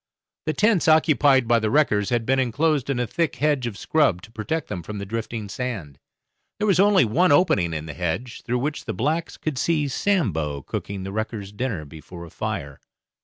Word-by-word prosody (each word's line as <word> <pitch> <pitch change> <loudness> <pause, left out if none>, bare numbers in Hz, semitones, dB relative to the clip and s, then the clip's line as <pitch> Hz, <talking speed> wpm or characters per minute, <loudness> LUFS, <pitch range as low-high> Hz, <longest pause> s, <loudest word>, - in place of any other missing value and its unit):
The 155 - +1
tents 210 -3 +2
occupied 145 -5 +4
by 120 0 +4
the 110 -1 0
wreckers 110 -7 +2
had 120 -2 0
been 135 +2 +2
enclosed 140 +3 +1
in 135 -3 0
a 125 - +1
thick 160 +3 -1
hedge 140 -2 +1
of 105 -4 -6
scrub 135 - +1
to 115 - -13
protect 115 +9 -3
them 95 -4 -5
from 105 +5 -7
the 100 - -5
drifting 110 0 -4
sand. 100 - -5 0.6
There 210 - -1
was 195 -4 +3
only 200 -6 +5
one 170 +11 +3
opening 105 - +3
in 80 -1 -4
the 80 - -7
hedge, 90 - -3
through 125 +1 -1
which 145 +4 -3
the - - -4
blacks 155 +7 -1
could 150 -5 -3
see 155 -3 +1
Sambo 95 - 0
cooking 100 +6 -5
the 95 - -5
wreckers' 110 -1 -4
dinner 105 -7 -3
before 80 +3 -10
a 85 - -13
fire. 70 -1 -4
120 Hz, 200 wpm, -23 LUFS, 100-150 Hz, 0.6 s, only